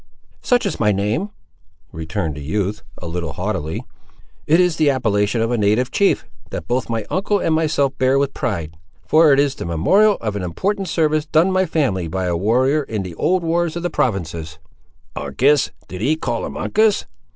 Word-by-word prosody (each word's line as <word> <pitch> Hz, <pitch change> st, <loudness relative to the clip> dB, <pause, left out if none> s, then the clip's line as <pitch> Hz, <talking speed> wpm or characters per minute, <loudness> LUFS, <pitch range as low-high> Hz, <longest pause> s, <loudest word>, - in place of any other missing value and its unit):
"Such 245 Hz, -2 st, +2 dB
is 200 Hz, -, -2 dB
my 105 Hz, -2 st, +3 dB
name," 105 Hz, -, -1 dB, 0.6 s
returned 80 Hz, +1 st, -3 dB
the 75 Hz, -, -8 dB
youth, 100 Hz, +7 st, -2 dB, 0.2 s
a -, -, -9 dB
little 85 Hz, -2 st, -4 dB
haughtily. 90 Hz, -4 st, -3 dB, 0.6 s
"It 160 Hz, +3 st, +4 dB
is 180 Hz, -2 st, +2 dB
the 155 Hz, -2 st, +3 dB
appellation 110 Hz, -4 st, +1 dB
of 115 Hz, +1 st, 0 dB
a 120 Hz, -, 0 dB
native 110 Hz, +5 st, +2 dB
chief, 200 Hz, -, +2 dB, 0.2 s
that 80 Hz, -, -6 dB
both 125 Hz, +1 st, -1 dB
my 115 Hz, -2 st, -2 dB
uncle 200 Hz, +2 st, +1 dB
and 165 Hz, -, 0 dB
myself 150 Hz, -4 st, +1 dB
bear 130 Hz, +1 st, +3 dB
with 140 Hz, 0 st, 0 dB
pride; 85 Hz, -7 st, -3 dB, 0.3 s
for 155 Hz, -1 st, +5 dB
it 135 Hz, -, +5 dB
is 140 Hz, -1 st, +2 dB
the -, -, -7 dB
memorial 195 Hz, -, +3 dB
of 105 Hz, -2 st, -3 dB
an 100 Hz, -, -3 dB
important 190 Hz, -, -2 dB
service 155 Hz, -2 st, +1 dB
done 160 Hz, +5 st, +3 dB
my 185 Hz, 0 st, +2 dB
family 125 Hz, -, 0 dB
by 95 Hz, +3 st, -2 dB
a 90 Hz, -1 st, 0 dB
warrior 125 Hz, -, +2 dB
in 110 Hz, -7 st, -4 dB
the 90 Hz, -2 st, -7 dB
old 180 Hz, -, +1 dB
wars 170 Hz, 0 st, 0 dB
of 170 Hz, -, -4 dB
the 175 Hz, -, -1 dB
provinces." 85 Hz, -, -2 dB, 0.6 s
"Uncas! 145 Hz, +1 st, +2 dB, 0.2 s
did 90 Hz, 0 st, -7 dB
ye 145 Hz, +7 st, +2 dB
call 160 Hz, -, -3 dB
him -, -, -8 dB
Uncas?" 215 Hz, -1 st, +2 dB
125 Hz, 190 wpm, -20 LUFS, -, 0.6 s, for